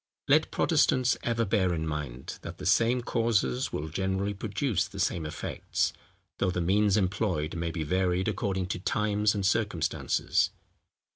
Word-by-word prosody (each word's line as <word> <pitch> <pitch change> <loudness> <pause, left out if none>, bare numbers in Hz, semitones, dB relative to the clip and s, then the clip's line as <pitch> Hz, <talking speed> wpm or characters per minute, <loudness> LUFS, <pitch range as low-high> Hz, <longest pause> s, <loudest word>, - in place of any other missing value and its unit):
Let - - +4
Protestants 130 -1 +3
ever 115 -1 0
bear 95 -4 +1
in 80 0 -2
mind, 75 -5 -5
that - - -8
the - - -8
same 120 +2 +3
causes 115 +3 0
will 75 - -3
generally 95 +4 -1
produce 100 - -1
the 100 0 -9
same 85 -4 0
effects, 75 - -2 0.5
though 100 - +2
the 90 - -1
means 100 +4 +3
employed 90 -5 0
may 85 0 -2
be 80 -1 -3
varied 90 +3 +1
according 95 -3 -1
to 90 - -2
times 105 +2 +1
and 100 -2 -1
circumstances. 100 -6 +1
95 Hz, 150 wpm, -28 LUFS, 85-105 Hz, 0.5 s, Let